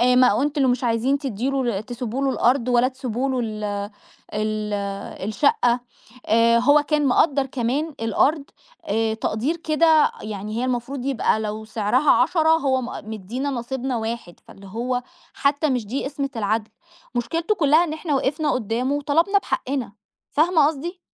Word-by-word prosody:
ما 250 -3 +4
أنتم 295 - 0
اللي 260 -2 +4
مش 245 +1 -2
عايزين 240 +4 +1
تدّي 260 -2 -2
له 240 -7 -1
تسيبوا 245 +1 -5
له - - +2
الأرض 250 -1 +2
ولا 245 +1 +4
تسيبوا 260 0 -3
له 255 - -1
ال 215 -1 -5 0.7
ال 215 0 -2 0.6
الشقة" 245 - +2 0.5
آآ، 230 +1 +4
هو 290 +4 +5
كان 295 -1 +1
مقدّر 275 +1 +3
كمان 270 +4 -2
الأرض 275 +7 +2 0.4
آآ، 220 +2 0
تقدير 225 +8 -1
كده 315 -1 +3
يعني 215 +1 -5
هي 245 - 0
المفروض 255 +1 -3
يبقى 250 -5 +1
لو 215 0 -4
سعرها 225 +6 +2
10 320 -3 +3
هو 275 -5 +3
م - - -4 0.3
مدّينا 235 +8 -4
نصيبنا 255 0 -3
1 225 -5 -5
فاللي 195 0 -13
هو 245 +5 -2 0.3
حتّى 285 +2 +1
مش 250 -4 -1
دي 265 +5 -3
قِسمِة 275 0 -3
العَدْل، 215 +1 -1 0.4
مشكِلتُه 330 - 0
كُلَّها 310 0 +4
إن 310 -3 -3
إحنا 310 -2 -2
وقفنا 290 +3 0
قُدَّامه 250 +3 -1
وطلبنا 330 +8 +2
بحقِّنا، 275 - -3 0.4
فاهمة 315 -1 +4
قصدي؟ 330 +5 -4
255 Hz, 155 wpm, -23 LUFS, 225-290 Hz, 0.7 s, هو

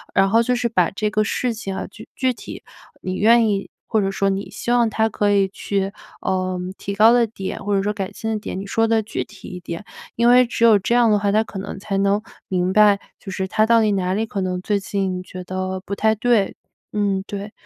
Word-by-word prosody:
然 195 0 +5
后 225 +3 +4
就 250 +2 +1
是 240 -1 0
把 180 -6 +2
这 210 +2 -2
个 215 0 +2
事 245 +2 -1
情 205 -4 -5
啊， 190 - -4
具 - - -13
具 260 -1 +1
体 - - -10 0.4
你 185 - -3
愿 230 +3 +5
意 200 -1 -2 0.2
或 220 -2 +2
者 195 - 0
说 195 0 0
你 195 -1 -3
希 215 +3 -4
望 240 -2 +3
她 220 +1 +1
可 205 -1 +1
以 200 -1 +3
去， 195 0 -2 0.3
呃， 185 -1 -1 0.2
提 200 - -5
高 220 +3 +7
的 240 -1 +4
点， 200 -2 -6
或 205 0 0
者 195 - +1
说 210 +1 0
改 195 -2 -4
进 225 0 -4
的 215 - -1
点， 200 - -5
你 195 - -6
说 225 +3 +1
得 225 -1 +2
具 215 - -3
体 205 - -13
一 180 - -7
点。 170 +1 -7 0.3
因 235 +1 +2
为 250 +1 +7
只 235 0 -2
有 220 -2 +7
这 215 +5 -1
样 240 -2 +5
的 210 - +4
话， 200 0 +1
她 215 +1 +3
可 205 - -9
能 195 - -6
才 195 0 -3
能 200 +1 +2 0.3
明 180 0 0
白， 210 -2 +5 0.2
就 195 - -8
是 190 0 -2
她 215 +3 +2
到 230 0 +4
底 215 - +2
哪 185 -1 0
里 215 +3 0
可 205 -3 -4
能 180 -1 -2
最 205 +1 0
近 195 -2 -2
觉 185 0 -8
得 185 +1 -3
不 200 - -6
太 220 +1 +2
对。 220 -2 +1 0.4
嗯， 200 -2 0
对。 205 +1 -6
205 Hz, 265 characters per minute, -21 LUFS, 195-220 Hz, 0.4 s, 高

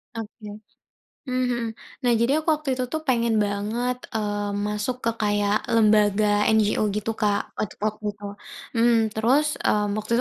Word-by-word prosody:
Oke. 220 -1 -8 0.8
Mmm 255 -1 0
mhm. 240 -1 -1 0.4
Nah, 240 - +4
jadi 235 +6 +2
aku 315 0 +2
waktu 295 -4 -2
itu 255 - 0
tuh 315 +5 -4
pengen 235 -6 +1
banget, 215 +5 -1 0.2
eee, 205 -2 -2
masuk 210 +5 -2
ke 230 - +1
kayak 205 -1 +1
lembaga 210 -1 +4
NGO 215 0 +2
gitu, 215 +2 -3
Kak, 205 -2 0
waktu 215 - -3
waktu 215 0 -2
itu, 205 0 -11 0.5
mhm 230 -1 +4
terus 260 +8 +1 0.4
waktu 215 +1 -5
220 Hz, 145 wpm, -24 LUFS, 210-245 Hz, 0.8 s, Nah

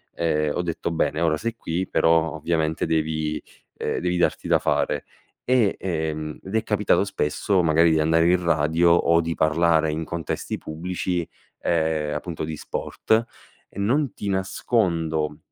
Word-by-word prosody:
ehm, 75 -3 0
ho - - 0
detto: 85 -1 -3
"Bene, 80 -1 0
ora 80 -2 +2
sei 115 +1 -3
qui, 90 -3 -3
però 80 0 +2
ovviamente 80 0 -1
devi 80 -1 -1 0.4
ehm, - - -2
devi 90 0 0
darti 90 - 0
da - - +4
fare." - - 0 0.4
E 120 -6 +2
ehm, 80 -3 -3
ed 95 +3 -6
è 110 - +2
capitato 105 -2 +2
spesso 95 +1 0
magari 85 +1 +4
di 80 - +2
andare 80 +2 +3
in 90 0 +3
radio 80 +1 +3
o 85 0 +4
di 85 0 -2
parlare 80 0 +3
in 80 +1 -3
contesti 85 -1 -4
pubblici, 90 +2 -3 0.3
ehm, 80 -3 0
appunto 80 +2 -4
di 80 0 -4
sport, 110 +8 -1 0.4
e 100 - -10
non 130 +5 +1
ti 100 - -5
nascondo, 85 -6 0
85 Hz, 155 wpm, -24 LUFS, 80-90 Hz, 0.4 s, da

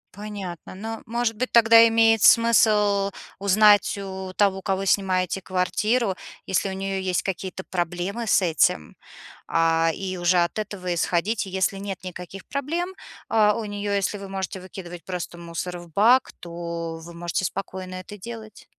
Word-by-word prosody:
Понятно. 200 -5 -7
Ну, 225 +3 -6
может 235 0 -1
быть, 255 +3 -2
тогда 230 0 +7
имеет 225 -1 +4
смысл 210 -4 +5 0.3
узнать 205 +1 +4
у 190 -1 -6
того, 195 -2 +2
кого 195 0 -1
снимаете 190 -1 +1
квартиру, 190 +4 0 0.3
если 190 +1 0
у - - -4
неё 195 0 -3
есть 185 -2 -1
какие-то 190 0 -4
проблемы 180 +6 -3
с 195 - +4
этим, 155 - +1 0.5
а, 165 0 +2
и 190 -1 -4
уже 175 0 +2
от 170 - -2
этого 190 -4 -3
исходить. 185 +6 0
И - - -8
если 190 +1 0
нет 195 -2 -6
никаких 180 +1 -8
проблем, 335 +7 -3 0.3
а, 210 -2 +4
у 225 0 -4
неё, 205 0 -3
если 200 +1 0
вы 200 -1 -8
можете 190 -1 -4
выкидывать 175 -2 -9
просто 180 -2 -5
мусор 170 +1 -5
в 175 -1 -13
бак, 240 +8 +4
то 170 -1 -5
вы 170 - -10
можете 170 +2 -3
спокойно 185 0 -5
это 185 +3 -9
делать. 220 +1 -10
195 Hz, 155 wpm, -24 LUFS, 180-210 Hz, 0.5 s, тогда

